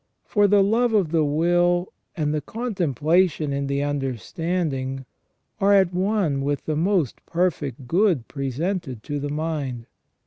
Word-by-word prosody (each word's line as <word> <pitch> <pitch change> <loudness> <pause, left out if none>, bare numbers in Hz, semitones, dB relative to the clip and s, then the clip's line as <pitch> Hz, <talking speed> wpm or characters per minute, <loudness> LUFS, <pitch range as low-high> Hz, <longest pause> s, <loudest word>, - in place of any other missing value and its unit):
For 205 -2 +3
the 200 0 +5
love 230 +4 +2
of 185 -7 +2
the 165 -2 +3
will 175 +4 +2 0.2
and 150 -2 0
the 155 - -1
contemplation 170 - 0
in 140 0 -2
the 140 +1 0
understand 145 - -2
ing 135 0 -4 0.5
are 200 +1 +4
at 190 -2 +3
one 185 -6 +1
with 145 +1 -2
the 155 - -1
most 170 - 0
perfect 145 -8 -1
good 175 - +2
presented 140 - -3
to 145 -1 -3
the 145 +1 -3
mind. 145 -6 -3
160 Hz, 145 wpm, -23 LUFS, 140-185 Hz, 0.5 s, the